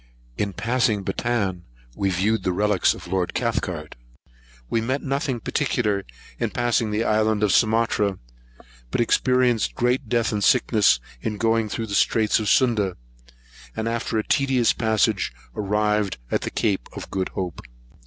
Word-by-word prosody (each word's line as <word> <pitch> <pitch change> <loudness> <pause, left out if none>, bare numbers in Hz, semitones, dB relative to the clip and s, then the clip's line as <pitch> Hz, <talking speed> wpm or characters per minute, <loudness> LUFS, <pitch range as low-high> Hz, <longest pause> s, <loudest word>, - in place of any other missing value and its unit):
In 100 +5 -2
passing 115 -1 0
Bantan, 100 -6 -1 0.3
we 100 - 0
viewed 100 +5 +1
the 90 - 0
relics 105 0 +2
of - - -11
Lord 90 0 -2
Cathcart. 95 -10 -2 0.7
We 115 - 0
met 130 +5 -2
nothing 135 -2 -1
particular 105 -6 -1 0.3
in - - 0
passing 120 -2 0
the 105 +2 0
island 110 -1 +1
of 105 - +3
Sumatra, 110 -3 +2 0.7
but - - -2
experienced 120 -2 +2
great 125 0 0
death 120 -2 +1
and 105 -2 -1
sickness 110 - +4 0.2
in 105 -1 -3
going 115 0 +1
through 115 +2 -3
the 105 - -6
Straits 110 +2 +3
of 105 -2 -1
Sunda; 105 -8 +2 0.8
and 110 - -2
after 115 -1 -2
a 110 - -2
tedious 130 -4 +2
passage, 110 - +1 0.2
arrived 105 -1 0
at - - +1
the - - -3
Cape 100 -4 -1
of - - -8
Good 95 -1 -1
Hope. 90 -2 -4
110 Hz, 150 wpm, -23 LUFS, 100-120 Hz, 0.8 s, sickness